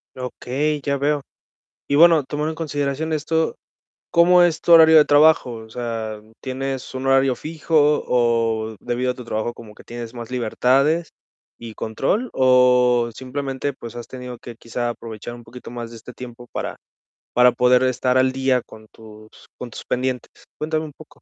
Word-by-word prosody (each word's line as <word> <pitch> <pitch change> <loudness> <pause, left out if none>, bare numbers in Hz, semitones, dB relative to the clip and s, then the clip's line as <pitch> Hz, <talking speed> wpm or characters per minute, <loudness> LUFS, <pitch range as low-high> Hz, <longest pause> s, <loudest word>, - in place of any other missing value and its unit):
Okey, 135 +4 -3
ya 140 0 0
veo. 145 +1 0 0.7
Y 140 - 0
bueno, 165 -3 +6
tomando 150 +3 -3
en - - -5
consideración 145 0 -2
esto, 160 +1 -1 0.5
¿cómo 175 +1 +5
es 165 -2 +2
tu 170 - +2
horario 160 -1 +8
de 150 - +8
trabajo? 145 -4 +4
O 110 -1 -11
sea, 115 -3 -5 0.2
¿tienes 135 0 -5
un 130 +1 -4
horario 135 -1 +3
fijo 150 0 +1
o 115 -2 0
debido 125 +1 -1
a - - -16
tu 125 -2 -10
trabajo 110 +1 -3
como 110 -3 -13
que - - -16
tienes 120 0 -8
más 120 0 -8
libertades 135 +7 +1 0.5
y 115 -2 -9
control? 165 - -2
¿O 125 -2 +4
simplemente, 135 +2 -4
pues, 120 -3 -10
has 120 - -7
tenido 125 -2 -8
que, 120 - -10
quizá 120 +1 -3
aprovechar 115 0 -8
un 120 - -13
poquito 125 0 -11
más 120 -1 -7
de 115 - -11
este 120 +2 -11
tiempo 120 -1 -10
para - - -4 0.6
para 125 0 +5
poder 125 +1 +3
estar 130 0 +1
al 130 0 +3
día 130 -1 +1
con 110 0 -15
tus 110 -1 -15 0.3
con 125 - -7
tus - - -10
pendientes? 125 0 -2 0.3
Cuéntame 155 +1 -2
un 150 - -9
poco. 155 +2 -15
125 Hz, 175 wpm, -21 LUFS, 120-145 Hz, 0.7 s, horario